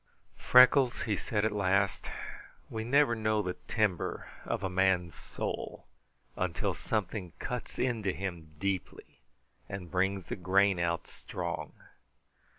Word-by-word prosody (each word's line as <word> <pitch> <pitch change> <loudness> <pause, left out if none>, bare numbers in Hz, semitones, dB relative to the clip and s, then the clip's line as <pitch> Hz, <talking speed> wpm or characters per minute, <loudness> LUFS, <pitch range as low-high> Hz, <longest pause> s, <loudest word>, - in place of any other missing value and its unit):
"Freckles," 125 0 +6
he 105 - 0
said 105 +1 -1
at 110 - +2
last, 100 -1 +1 0.6
"we 110 0 -3
never 140 +1 +4
know 110 -1 +1
the 90 -1 -2
timber 105 -6 0 0.2
of - - -2
a - - +1
man's 90 -2 +2
soul - - -5 0.5
until - - -1
something 100 -4 -3
cuts 125 -2 -5
into 115 -6 0
him 85 -5 -6
deeply 95 -2 -4 0.5
and 90 -4 -6
brings 95 +1 +1
the - - -4
grain 95 +1 +3
out 85 -2 0
strong. 85 -4 -5
100 Hz, 125 wpm, -31 LUFS, 90-110 Hz, 0.6 s, Freckles